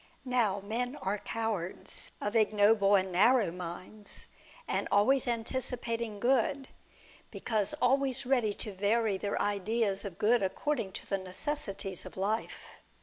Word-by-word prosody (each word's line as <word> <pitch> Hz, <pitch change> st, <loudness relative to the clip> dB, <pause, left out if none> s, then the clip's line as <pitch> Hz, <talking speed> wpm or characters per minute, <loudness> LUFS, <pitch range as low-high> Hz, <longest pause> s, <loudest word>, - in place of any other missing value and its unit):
'Now, 230 Hz, -6 st, +1 dB
men 240 Hz, +6 st, -2 dB
are 200 Hz, -4 st, -2 dB
cowards, 215 Hz, -6 st, -4 dB
of 205 Hz, +2 st, -3 dB
ignoble 210 Hz, -1 st, +4 dB
and 190 Hz, -1 st, +1 dB
narrow 210 Hz, +2 st, +4 dB
minds, 180 Hz, +4 st, -6 dB, 0.4 s
and -, -, 0 dB
always 260 Hz, +6 st, +4 dB
anticipating 235 Hz, -2 st, -2 dB
good, 265 Hz, +3 st, +1 dB, 0.6 s
because 215 Hz, +2 st, -1 dB
always 270 Hz, +1 st, +2 dB
ready 245 Hz, -5 st, +2 dB
to 210 Hz, 0 st, -4 dB
vary 205 Hz, +1 st, +1 dB
their 200 Hz, +1 st, -2 dB
ideas 205 Hz, 0 st, 0 dB
of 195 Hz, -4 st, -6 dB
good 230 Hz, +4 st, +3 dB
according 205 Hz, +1 st, -1 dB
to -, -, -6 dB
the 195 Hz, -, 0 dB
necessities 195 Hz, -, -3 dB
of -, -, -12 dB
life. 210 Hz, +4 st, -3 dB
215 Hz, 130 wpm, -31 LUFS, 195-245 Hz, 0.6 s, ignoble